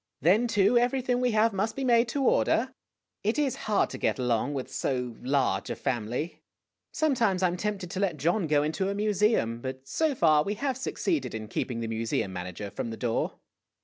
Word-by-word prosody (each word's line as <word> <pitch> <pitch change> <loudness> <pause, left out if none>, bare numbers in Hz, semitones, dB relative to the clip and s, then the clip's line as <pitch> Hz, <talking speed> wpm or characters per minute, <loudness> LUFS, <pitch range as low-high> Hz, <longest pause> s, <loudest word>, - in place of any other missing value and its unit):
Then, 200 - +4
too, 210 +2 +4
everything 250 0 +1
we 250 - +2
have 220 +1 +3
must 215 +3 -1
be 275 - -3
made 240 -2 +4
to 275 +3 -1
order. 255 0 +2 0.5
It 215 +6 +1
is 285 -4 +1
hard 210 - +2
to - - -6
get - - +1
along 125 +2 0
with 130 - -5
so 125 -3 -2
large 130 -7 0
a - - -2
family. 125 +4 -3 0.5
Sometimes 230 -11 +1
I - - +6
'm 175 - -3
tempted 195 -2 -3
to 185 - -3
let 190 -6 0
John 170 +5 +1
go 145 -1 +3
into 160 +6 -1
a 200 - -2
museum; 205 - +1
but 130 +1 -6
so 310 - 0
far 155 -7 +4
we 200 +7 -2
have 265 +4 -1
succeeded 295 - -2
in 110 -1 -5
keeping 115 +1 -3
the 115 - -2
mu 110 0 -3
seum 110 -4 -1
manager 90 +2 -6
from 115 - -4
the 115 - -6
door." 120 -2 -1
185 Hz, 205 wpm, -28 LUFS, -, 0.5 s, I